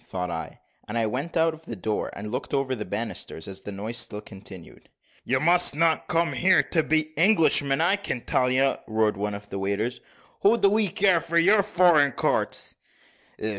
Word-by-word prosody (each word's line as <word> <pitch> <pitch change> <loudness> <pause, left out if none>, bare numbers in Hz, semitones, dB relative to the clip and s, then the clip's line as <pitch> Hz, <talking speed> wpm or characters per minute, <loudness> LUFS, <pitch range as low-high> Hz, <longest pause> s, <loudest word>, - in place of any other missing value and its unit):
thought 90 -1 -5
I: - - -6 0.3
and 105 - -4
I 115 - +1
went 140 +10 -3
out 165 0 +2
of 160 0 -14
the 115 - -6
door 105 +2 -3
and 105 +1 -7
looked 125 +3 -3
over 135 -1 -1
the 105 -4 -5
banisters, 100 -5 -4
as 95 0 -6
the 105 - -7
noise 105 +4 -4
still 115 -3 -3
continued. 95 -4 -12 0.4
"You 130 +1 +1
must 175 -1 +4
not 165 +1 +1
come 170 0 +1
here 185 +1 +3
to 165 - 0
beat 155 0 0
Englishmen, 160 -6 +3
I 185 +5 +3
can 165 -11 -4
tell 125 +1 0
you," 135 +2 +2
roared 110 -1 +1
one 105 +1 -3
of 100 0 -11
the 100 - -5
waiters. 105 +5 -2 0.4
"What 220 +3 +2
do 200 - +6
we 210 +1 +1
care 185 -2 +2
for 170 0 -2
your 200 +5 +5
foreign 175 -8 +3
counts?" - - -2
135 Hz, 195 wpm, -25 LUFS, 105-170 Hz, 0.4 s, do